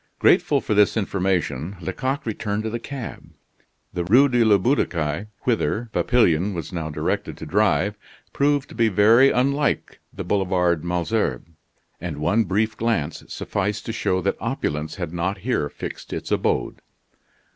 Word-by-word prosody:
Grateful - - +4
for - - -1
this 105 +1 +4
information, 95 - -1
Lecoq 130 - -3
returned 105 -1 -2
to 110 - -3
the 120 - -3
cab. 135 -1 -7 0.6
The 85 - -1
Rue 125 +11 +5
de 120 -2 +3
la 105 -2 +5
Butte 125 +9 +2
aux - - +3
Cailles, 80 +3 -3 0.2
whither 115 -1 0
Papillon 100 -5 +2
was 85 +2 -6
now 80 -3 -3
directed 75 - -2
to - - -7
drive, 105 +3 +1 0.3
proved 145 0 +1
to - - -11
be 115 -2 +2
very 110 +7 +6
unlike 140 +4 0
the 95 - -6
Boulevard 90 -3 +1
Malesherbes, 85 - -1 0.5
and 80 -3 -5
one 100 +10 +2
brief 105 +4 0
glance 110 -10 -1
sufficed 105 +2 -3
to 115 - -3
show 95 -5 0
that - - 0
opulence 75 +1 -2
had 80 - -5
not 90 +4 -1
here 95 - -1
fixed - - -7
its - - -5
abode. - - 0
100 Hz, 155 wpm, -23 LUFS, 85-115 Hz, 0.6 s, very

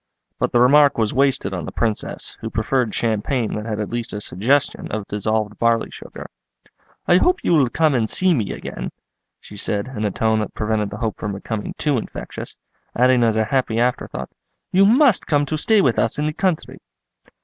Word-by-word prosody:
But - - 0
the 120 - +3
remark 140 +3 +5
was 110 -2 0
wasted 135 -7 +1
on 90 -4 -4
the - - -6
Princess, 110 -2 -3
who - - -4
preferred 115 +1 -1
champagne 115 +1 -1
that 105 +1 -4
had 110 -2 -3
at 105 - -4
least 120 -1 -4
a 105 - -3
suggestion 120 +9 0
of 105 -1 -4
dissolved 105 +1 -2
barley 115 -1 +1
sugar. - - -10 0.8
"I 175 - +6
hope 360 - +2
you - - +2
will 140 -6 +4
come 155 +2 +2
and 115 -4 0
see 185 -1 +3
me 115 -10 -1
again," - - -6 0.5
she 105 - -13
said, 100 +3 -1
in 105 - -3
a 105 - +1
tone 110 +2 +1
that 105 - -4
prevented 105 -1 -1
the - - -7
hope 115 -3 -3
from 105 -1 -4
becoming 105 +2 -5
too 145 -5 +1
infectious; - - -8 0.4
adding 125 0 +4
as 110 -1 +2
a 110 - +2
happy 120 -2 0
afterthought, 125 +1 -2 0.4
"you 195 +2 +5
must 250 -1 +4
come 145 -1 +2
to 155 - -3
stay 210 +7 +3
with 125 -8 +2
us 115 - +1
in 150 - -1
the 155 - -1
country." 180 -1 -2
115 Hz, 200 wpm, -21 LUFS, 110-145 Hz, 0.8 s, I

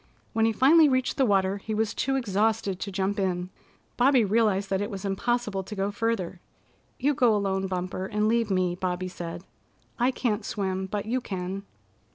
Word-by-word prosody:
When 225 -1 +3
he 225 - +3
finally 295 +7 +6
reached 255 -1 0
the 265 - +3
water 195 -1 +2
he 215 +2 -4
was 220 0 0
too 270 0 0
exhausted 215 -4 0
to 200 - -4
jump 195 +1 -1
in. 180 -1 -1 0.5
Bobby 255 -2 +5
realized 200 -2 +1
that 190 0 +1
it 205 - -2
was 200 -2 -6
impossible 210 +1 -1
to 200 +3 -8
go 195 +1 -1
further. 205 -5 -2 0.6
"You 285 +3 +2
go 240 -4 +3
alone, 195 -1 0
Bumper, 185 0 -3
and 210 +1 0
leave 230 -1 +2
me," 185 -2 +1
Bobby 180 0 -2
said. 170 -1 -7 0.6
"I 245 +2 +4
can't 230 -5 -1
swim, 190 -3 -2
but 205 +1 -3
you 250 +4 -1
can." 190 -1 -5
205 Hz, 185 wpm, -27 LUFS, 190-230 Hz, 0.6 s, finally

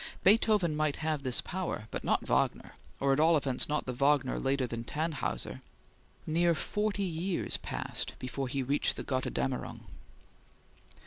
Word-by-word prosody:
Beethoven 205 -5 +4
might 155 -1 +1
have 155 -2 0
this 130 -3 +1
power, 175 - -4
but - - -4
not - - +1
Wagner, - - 0 0.3
or 135 0 +3
at 135 - +1
all 160 +1 +6
events 135 -2 +1
not 150 0 0
the 125 - -3
Wagner 140 +1 +2
later 135 -1 +1
than 115 -1 -4
"Tannhauser." 150 - -2 0.6
Near 170 +1 +3
forty 210 +5 -1
years 175 0 -1
passed - - -3
before 130 +1 -3
he 135 +1 -1
reached 140 +3 +1
the - - -5
"Gotterdammerung." 130 0 -2
150 Hz, 145 wpm, -31 LUFS, 130-170 Hz, 0.6 s, all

